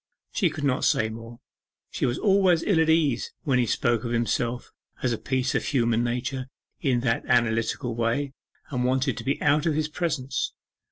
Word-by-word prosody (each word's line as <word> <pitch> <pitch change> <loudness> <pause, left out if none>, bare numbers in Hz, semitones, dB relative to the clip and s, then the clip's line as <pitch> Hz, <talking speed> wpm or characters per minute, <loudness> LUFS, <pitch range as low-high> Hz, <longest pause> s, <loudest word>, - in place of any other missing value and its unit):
She 185 -6 +2
could 155 -1 -6
not 130 -3 +1
say 110 - +2
more. 115 +1 -9 0.5
She - - 0
was 120 - -1
always 190 -4 +3
ill 190 -6 +2
at 160 0 +3
ease 155 -7 +2
when 135 -6 +2
he 120 - +2
spoke 120 0 +1
of 120 - -3
himself 120 +1 -1 0.3
as 125 -2 +2
a - - -2
piece 130 0 -1
of - - 0
human 120 -4 +1
nature 125 +2 -2 0.3
in 125 -4 +1
that 115 -2 0
analytical 120 +1 +1
way, 120 +5 -1 0.4
and 125 -2 -1
wanted 130 0 +1
to - - -6
be 135 +4 -1
out 150 +3 +3
of 155 - +1
his 155 0 0
presence. 150 -6 -2
130 Hz, 185 wpm, -26 LUFS, 120-145 Hz, 0.5 s, always